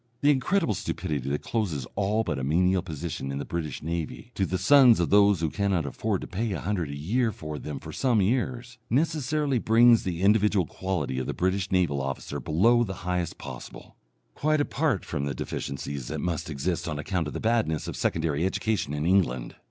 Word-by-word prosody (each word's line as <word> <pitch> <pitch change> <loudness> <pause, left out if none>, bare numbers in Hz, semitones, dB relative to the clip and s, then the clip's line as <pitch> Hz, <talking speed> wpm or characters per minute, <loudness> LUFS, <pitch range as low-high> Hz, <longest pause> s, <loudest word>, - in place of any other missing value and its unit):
The 145 - +5
incredible 145 - +1
stupidity 70 -7 -3
that 75 +1 -2
closes 90 - -2
all 105 +3 +1
but 80 -9 -2
a - - -4
menial 90 +6 +2
position 80 -5 -5
in 70 - -3
the 70 - -4
British 80 -5 -4
Navy 85 +8 -4
to 95 - 0
the 95 - -1
sons 125 +3 +6
of 85 - 0
those 100 -3 +5
who 80 -2 0
cannot 100 -6 0
afford 70 - -2
to - - -6
pay 110 +3 -2
a 85 - -3
hundred 90 -5 -2
a 70 - -5
year 110 - 0
for 75 -5 -6
them 75 -3 -6
for - - -9
some 125 -5 +1
years, 120 +3 -1
necessarily 150 -1 +1
brings 115 +1 +5
the 90 -1 -3
individual 105 -2 +4
quality 80 -8 -3
of 65 - -3
the - - -3
British 95 +2 0
naval 85 -7 +2
officer 70 +1 -4
below 105 - +3
the 95 -4 -4
highest 90 -2 -1
possible, - - -10 0.4
quite 155 +1 +1
apart 145 - 0
from 70 -4 -3
the 70 - -3
deficiencies 70 -2 -5
that 80 - -4
must 85 0 -2
exist 80 +5 -2
on 75 -3 -3
account 85 +1 -2
of - - -6
the - - -3
badness 110 -9 0
of - - -4
secondary 80 -1 0
education 95 -5 -1
in 75 +1 -2
England. 85 -10 +1
90 Hz, 200 wpm, -27 LUFS, 75-115 Hz, 0.4 s, sons